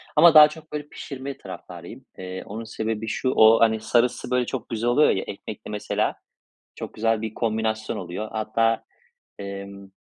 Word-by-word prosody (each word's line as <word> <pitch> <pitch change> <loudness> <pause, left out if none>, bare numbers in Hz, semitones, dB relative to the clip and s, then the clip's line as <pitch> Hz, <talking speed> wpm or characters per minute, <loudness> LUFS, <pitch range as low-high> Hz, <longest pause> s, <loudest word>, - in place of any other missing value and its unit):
ama 170 -1 +8
daha 150 -1 +10
çok, 155 0 -13
böyle, 150 -1 -4
pişirme 135 -1 -7
taraftarıyım. 90 +6 -10
Eee, 95 0 -6
onun 110 +3 -6
sebebi 110 -1 -4
şu, 130 +4 -1
o, 110 +1 +6
hani, 110 -1 +4
sarısı 120 +2 +1
böyle 125 -1 +2
çok 125 -2 -5
güzel 115 +1 -1
oluyor 145 +5 +5
ya, 95 - +1
ekmekle 105 +1 -8
mesela 105 - -1 0.6
çok - - -8
güzel 115 0 0
bir 110 -1 -4
kombinasyon 110 -1 -1
oluyor. 90 +4 -5
Hatta, 115 +1 0 0.5
emm 100 0 -8
110 Hz, 160 wpm, -24 LUFS, 105-125 Hz, 0.6 s, daha